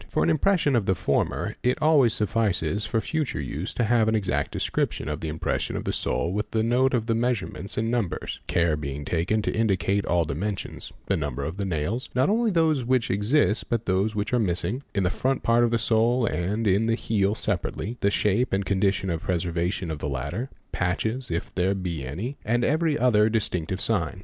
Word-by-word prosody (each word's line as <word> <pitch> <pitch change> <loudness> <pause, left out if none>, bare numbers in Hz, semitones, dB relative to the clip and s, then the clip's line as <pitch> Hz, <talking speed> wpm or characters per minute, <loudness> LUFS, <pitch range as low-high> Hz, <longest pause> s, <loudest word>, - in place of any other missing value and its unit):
For - - +1
an 170 - +3
impression 160 -3 +2
of 110 -5 +1
the 95 - +3
former - - -1
it 125 - +1
always 150 -7 +4
suffices 105 -1 0
for 115 - +1
future 155 -1 -2
use 75 +6 -4
to 120 - +1
have 115 0 +3
an 110 - +2
exact 95 -4 0
description - - -1
of 75 0 -3
the 80 - -3
impression 80 +1 -2
of - - -4
the - - -2
sole 85 - -1
with 105 +1 -2
the 110 -1 0
note 125 +3 +3
of 115 -2 0
the 115 - +1
measurements 115 -5 -2
and 115 +1 0
numbers, 115 -7 -2
care 85 -2 +2
being 70 -1 -5
taken 90 +8 0
to - - 0
indicate 100 -2 +1
all 85 -1 +2
dimensions, 95 +7 -4
the 100 - +1
number 70 -5 -3
of 80 +6 -4
the 100 - -2
nails 95 - -2
(not 130 +5 +3
only 230 +1 +2
of 190 - -3
those 160 -5 +3
which 125 -1 +1
exist 105 +4 +1
but 115 -2 +1
of - - -33
those 100 +4 +1
which 105 +4 -2
are 125 - +4
missing) 105 +5 -1
in 100 - +2
the 90 - +1
front 135 +5 -1
part 115 +1 +4
of 120 - +3
the 115 - +2
sole 115 +2 +2
and 105 +4 -1
in 100 +3 +3
the 115 - +2
heel 105 -3 0
separately, 115 +1 -2
the 100 - +2
shape 105 +4 +1
and 95 0 +1
condition 95 -1 +1
of 80 -1 -2
preservation 85 0 -1
of 75 - -4
the 70 - -3
latter, 70 - -3 0.2
patches 110 +8 -1
if 85 +2 -3
there 95 +2 +1
be 85 -6 -3
any, 95 - -5
and 120 +3 +1
every 155 +1 +2
other 110 -3 +4
distinctive 95 -5 -1
sign. 95 -3 -1
105 Hz, 215 wpm, -25 LUFS, 90-120 Hz, 0.2 s, always